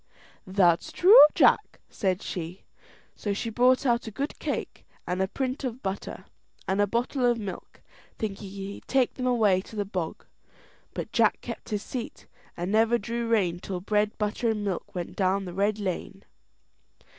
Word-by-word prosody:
"That's 185 Hz, -3 st, +3 dB
true, 400 Hz, +7 st, +8 dB, 0.2 s
Jack," -, -, +3 dB
said 190 Hz, -2 st, -1 dB
she. 175 Hz, +1 st, -6 dB, 0.5 s
So 205 Hz, -, -2 dB
she 225 Hz, +3 st, -3 dB
brought 255 Hz, +4 st, +3 dB
out 235 Hz, -2 st, +1 dB
a -, -, -2 dB
good 275 Hz, +7 st, -4 dB
cake, -, -, -4 dB, 0.2 s
and 180 Hz, +1 st, -1 dB
a 190 Hz, -, +2 dB
print 260 Hz, +6 st, -3 dB
of 255 Hz, -1 st, -4 dB
butter, 195 Hz, 0 st, -5 dB, 0.4 s
and 195 Hz, +2 st, +1 dB
a 205 Hz, -, +3 dB
bottle 245 Hz, +5 st, -1 dB
of 240 Hz, -1 st, +3 dB
milk, 205 Hz, -4 st, -7 dB, 0.4 s
thinking 200 Hz, -2 st, -4 dB
he'd 195 Hz, +1 st, -8 dB
take 265 Hz, -2 st, +2 dB
them 255 Hz, -1 st, -3 dB
away 215 Hz, -7 st, +3 dB
to 220 Hz, -, -13 dB
the 205 Hz, -1 st, -1 dB
bog. 180 Hz, -4 st, -4 dB, 0.7 s
But -, -, -5 dB
Jack -, -, +3 dB
kept -, -, -7 dB
his 210 Hz, -2 st, -2 dB
seat, 245 Hz, -3 st, -6 dB, 0.3 s
and 175 Hz, +2 st, -3 dB
never 225 Hz, +2 st, +4 dB
drew 235 Hz, +2 st, -3 dB
rein 190 Hz, -7 st, +1 dB
till 185 Hz, 0 st, -5 dB
bread, 210 Hz, +2 st, 0 dB
butter, 210 Hz, +2 st, -1 dB
and 210 Hz, -2 st, -1 dB
milk 190 Hz, -2 st, -4 dB
went 175 Hz, -1 st, -5 dB
down 195 Hz, 0 st, +1 dB
the 180 Hz, -, -7 dB
red 200 Hz, +3 st, +1 dB
lane. 195 Hz, 0 st, -4 dB
205 Hz, 170 wpm, -27 LUFS, 190-235 Hz, 0.7 s, true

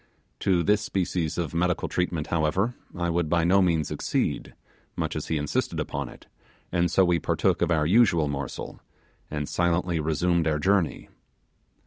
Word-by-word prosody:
To 90 Hz, -3 st, +2 dB
this 105 Hz, +4 st, +3 dB
species 90 Hz, -6 st, -2 dB
of 85 Hz, -3 st, -2 dB
medical 90 Hz, +1 st, 0 dB
treatment, 85 Hz, -4 st, -1 dB
however, 85 Hz, +8 st, +1 dB, 0.2 s
I 85 Hz, -1 st, 0 dB
would 85 Hz, -2 st, 0 dB
by 85 Hz, 0 st, +2 dB
no 95 Hz, +4 st, +4 dB
means 85 Hz, -5 st, +1 dB
accede, -, -, -2 dB, 0.4 s
much -, -, -2 dB
as -, -, -4 dB
he 80 Hz, -, 0 dB
insisted 75 Hz, -1 st, -1 dB
upon -, -, -3 dB
it; -, -, -14 dB, 0.5 s
and 85 Hz, 0 st, +2 dB
so 95 Hz, +3 st, +4 dB
we 85 Hz, -1 st, +2 dB
partook -, -, +1 dB
of 85 Hz, -, +2 dB
our 80 Hz, -3 st, +2 dB
usual 85 Hz, -4 st, +4 dB
morsel, 70 Hz, -2 st, -5 dB, 0.5 s
and 75 Hz, -1 st, -3 dB
silently 85 Hz, -1 st, 0 dB
resumed 80 Hz, +2 st, +1 dB
our 75 Hz, -1 st, +1 dB
journey. 95 Hz, +1 st, +1 dB
85 Hz, 160 wpm, -26 LUFS, 80-90 Hz, 0.5 s, no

